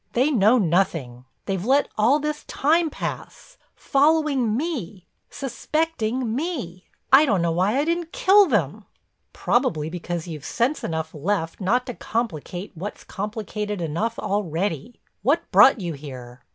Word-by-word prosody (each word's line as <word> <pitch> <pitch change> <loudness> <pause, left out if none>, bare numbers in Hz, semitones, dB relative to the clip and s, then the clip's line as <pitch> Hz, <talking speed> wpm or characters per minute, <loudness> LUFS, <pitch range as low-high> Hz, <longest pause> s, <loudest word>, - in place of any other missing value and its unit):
They 260 +5 +2
know 225 -1 +4
nothing. 165 - 0 0.2
They've 190 -2 -2
let 275 +5 +3
all 230 +7 +4
this 300 0 -3
time 320 +3 +2
pass—following 290 - -1
me, 245 - -4 0.2
suspecting 260 -4 -2
me. 255 - -4 0.3
I 275 +3 +9
don't 200 -7 +2
know 170 - +1
why 190 +8 +1
I 285 - +1
didn't 335 0 -2
kill 395 +1 +5
them!" 205 - -1 0.5
"Probably 165 - 0
because 175 -1 -4
you've 155 -4 -7
sense 250 - -1
enough 160 -1 -3
left 165 +3 -2
not 245 +7 +1
to 250 - -5
complicate 200 -6 -4
what's 190 +4 -7
complicated 210 0 -4
enough 170 +8 -2
already. 190 - -2 0.2
What - - +2
brought 265 -3 +7
you 175 -4 -3
here?" 125 -4 -10
210 Hz, 135 wpm, -23 LUFS, 170-270 Hz, 0.5 s, I